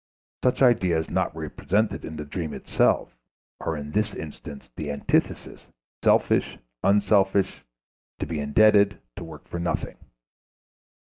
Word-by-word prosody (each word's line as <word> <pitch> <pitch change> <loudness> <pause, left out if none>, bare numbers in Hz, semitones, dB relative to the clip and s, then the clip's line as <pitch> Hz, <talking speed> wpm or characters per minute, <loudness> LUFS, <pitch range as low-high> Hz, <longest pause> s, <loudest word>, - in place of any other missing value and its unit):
Such 125 +1 +2
ideas 90 -10 +3
not - - 0
represented 105 +3 -1
in 80 - -7
the 75 - -6
dream 80 +1 -4
itself - - +1 0.4
are 80 - -2
in 75 0 -6
this 105 +4 0
instance 75 -3 -9
the 75 -2 -5
antitheses 70 - -1 0.4
selfish, - - +3 0.3
unselfish, 100 -1 +2 0.5
to - - -3
be 80 -3 -4
indebted, 100 +7 +4 0.2
to - - -6
work 80 -2 -11
for 85 - -5
nothing. 85 - -2
85 Hz, 125 wpm, -25 LUFS, 75-100 Hz, 0.5 s, indebted